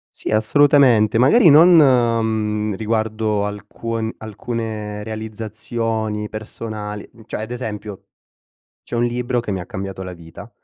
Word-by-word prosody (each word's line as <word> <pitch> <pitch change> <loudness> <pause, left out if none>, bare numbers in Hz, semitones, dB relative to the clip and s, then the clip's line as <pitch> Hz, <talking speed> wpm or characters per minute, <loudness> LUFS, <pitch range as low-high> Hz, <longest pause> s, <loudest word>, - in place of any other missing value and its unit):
Sì, - - -5
assolutamente. 120 -1 +4
Magari 165 - +6
non, 160 +5 +8
mhmm, 110 -6 +2
riguardo 110 -1 -1
alcun 110 +2 -4
alcune 110 -1 -5
realizzazioni 110 0 -4
personali, 110 -1 -7 0.2
cioè, - - -5
ad 115 +3 -6
esempio, 105 -5 -6 0.8
c'è - - -7
un 120 - +1
libro 120 0 -1
che 105 - -5
mi 95 - -2
ha 90 - -7
cambiato 95 0 -6
la 90 -1 -7
vita. 85 -1 -12
110 Hz, 125 wpm, -20 LUFS, 105-120 Hz, 0.8 s, non